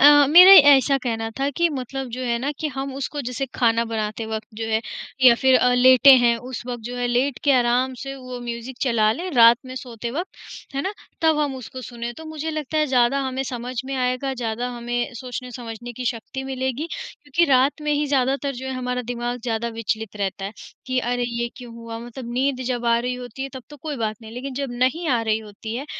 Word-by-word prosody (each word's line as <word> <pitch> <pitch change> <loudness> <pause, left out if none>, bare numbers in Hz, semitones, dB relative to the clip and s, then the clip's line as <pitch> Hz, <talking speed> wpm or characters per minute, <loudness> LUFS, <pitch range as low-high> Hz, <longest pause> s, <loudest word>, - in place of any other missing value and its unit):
अ, 290 -1 +8
मेरे 365 +4 +11 0.2
ऐसा 275 +1 +4
कहना 225 -2 -2
था 275 - +1
कि 340 0 +3
मतलब 270 -2 -5
जो - - -5
है 235 -1 0
ना 270 +4 -2
कि 315 - -2
हम 270 0 -4
उसको 280 +2 -4
जैसे 250 0 -3
खाना 230 -1 +2
बनाते 220 -1 -3
वक़्त 220 -1 -4
जो 225 +1 -4
है, 220 0 +1 0.4
या 250 -2 +9
फिर 260 +2 +3
अ, 250 - +3
लेटे 255 +2 +7
हैं 240 -1 +3
उस 250 +1 -7
वक़्त 245 -2 -5
जो 245 +1 -5
है 245 0 -1
लेट 250 +2 0
के 285 - +5
आराम 250 +1 +2
से 275 0 -5
वो 255 -1 -8
म्यूज़िक 240 +1 -6
चला 230 -5 +2
लें 350 +10 -5
रात 230 0 +8
में 255 - -8
सोते 240 -3 -6
वक़्त, 345 +8 -4 0.4
है 275 - -1
ना? 385 - -2 0.3
तब 320 -2 +3
हम 290 -3 0
उसको 255 +1 -8
सुनें 240 0 -6
तो 320 - -10
मुझे 315 0 -4
लगता 310 0 -3
है 305 - +2
ज़्यादा 255 0 +3
हमें 265 0 -2
समझ 250 -1 -5
में 270 +1 -4
आएगा 255 +1 -1
ज़्यादा 240 0 -3
हमें 240 +2 -3
सोचने-समझने 245 -1 -7
की 250 +2 -7
शक्ति 245 +2 -4
मिलेगी 265 +2 -3
क्योंकि 340 - -1
रात 265 +3 +3
में 300 - -1
ही 295 0 +1
ज़्यादातर 275 0 0
जो 260 +2 -7
है 265 - -3
हमारा 250 0 -2
दिमाग 240 +1 -3
ज़्यादा 235 -1 -2
विचलित 225 -1 -4
रहता 195 -1 -3
है, 200 - -5 0.3
कि 255 -1 0
अरे! 245 0 -1
ये 235 0 -2
क्यों 245 -2 -10
हुआ 230 -1 -7
मतलब 240 +1 -8
नींद 260 +1 0
जब 245 -2 -2
आ 235 0 +4
रही 250 +1 -2
होती 250 +1 -7
है 270 - -3
तब 260 - -7
तो 295 - -10
कोई 295 +1 -5
बात 215 -3 -2
नहीं, 220 0 -10
लेकिन 255 +3 -6
जब 275 -1 -3
नहीं 260 +8 0
आ 245 -4 +2
रही 220 -1 +1
होती 220 +1 -8
है 275 +4 -5
250 Hz, 225 wpm, -22 LUFS, 235-270 Hz, 0.4 s, मेरे